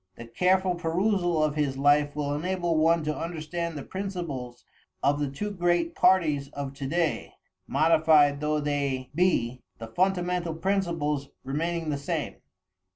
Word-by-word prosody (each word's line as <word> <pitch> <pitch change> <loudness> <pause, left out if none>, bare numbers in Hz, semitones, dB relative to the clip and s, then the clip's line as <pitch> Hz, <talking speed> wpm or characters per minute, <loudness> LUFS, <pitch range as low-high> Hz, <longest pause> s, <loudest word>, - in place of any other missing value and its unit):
The 120 - -9
careful 185 +9 +2
perusal 175 -1 +1
of 155 -1 +1
his 145 -3 -1
life 145 +1 +3
will 145 -1 -1
enable 175 +2 -1
one 165 +1 +3
to 150 0 -2
understand 170 0 -4
the 140 - -5
principles 170 -11 -5 0.4
of 145 +2 +2
the 145 -2 -1
two 205 +10 -4
great 175 -3 +1
parties 155 -7 +3
of 140 -1 -5
to 135 0 -5
day, 165 +1 -1 0.3
modified 155 -3 +4
though 150 0 0
they 140 -3 -2
be, 130 -8 +1 0.2
the 115 - -7
fundamental 180 +4 0
principles 165 -6 -1
remaining 160 +4 -2
the 140 - -2
same. 140 - -3
155 Hz, 145 wpm, -27 LUFS, 145-175 Hz, 0.4 s, modified